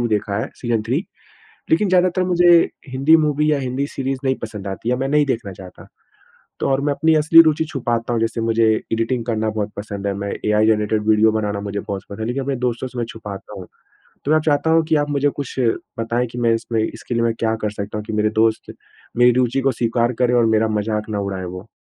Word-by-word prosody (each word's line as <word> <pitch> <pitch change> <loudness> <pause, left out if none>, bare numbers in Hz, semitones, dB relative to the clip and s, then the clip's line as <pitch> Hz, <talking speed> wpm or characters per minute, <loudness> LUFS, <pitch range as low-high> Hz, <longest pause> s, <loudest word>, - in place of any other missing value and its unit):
2 120 - +1
देखा 105 -2 -1
है 110 - -4
सीज़न 120 -3 -1
3। 135 +8 +1 0.7
लेकिन 215 -11 +3
ज़्यादातर 185 0 +2
मुझे 175 -1 +4 0.4
हिंदी 135 +5 +4
मूवी 150 -1 +1
या 145 - +2
हिंदी 130 +2 -2
सीरीज़ 135 -1 -3
नहीं 130 0 +2
पसंद 105 -3 -6
आती 95 +4 -5
है 125 - +1
मैं 135 - -1
नहीं 150 0 +3
देखना 115 -6 -2
चाहता। 90 0 -13 0.7
तो - - 0
और 135 0 +1
मैं 145 0 +1
अपनी 160 +3 +2
असली 160 +2 +7
रूचि 160 -1 +2
छुपाता 120 -5 -2
हूँ 115 - 0
जैसे 115 0 -1
मुझे 115 0 +1 0.3
एडिटिंग 115 +2 -1
करना 110 -2 -1
बहुत 105 -1 -3
पसंद 100 -1 -5
है, 100 - 0
मैं 100 0 -4
एआई 105 +1 +3
जनरेटेड 105 0 +1
वीडियो 110 0 +4
बनाना 105 -2 -2
मुझे 100 0 -4
बहुत 100 -1 -5 0.2
लेकिन 120 +5 -2
अपने 135 0 -2
दोस्तों 120 +2 -3
से 125 - -11
मैं 120 - -1
छुपाता 105 -2 -9
हूँ। 90 - -10 0.6
तो 145 - 0
मैं 155 - +5
चाहता 150 +1 +2
हूँ 165 0 +4
कि 155 - +1
आप 145 0 +1
मुझे 145 0 +2
कुछ 140 - -7 0.4
बताएँ 115 +2 -1
कि 120 +1 -10
मैं 115 -1 +3
इसमें 115 -1 -2
इसके 120 - -5
लिए 115 - +1
मैं 115 - +1
क्या 110 -1 +1
कर 105 - -1
सकता 105 0 -5
हूँ 105 - -6
कि 110 - -6
मेरे 105 0 +1
दोस्त 110 -1 0 0.4
मेरी 120 0 +6
रूचि 125 +2 +1
को 135 0 +2
स्वीकार 120 0 0
करें 125 - +2
और 120 -2 +4
मेरा 110 0 +2
मज़ाक 105 0 -2
ना 105 - -2
उड़ाए 95 -2 -4
वो? 90 +4 -8
115 Hz, 230 wpm, -20 LUFS, 105-135 Hz, 0.7 s, असली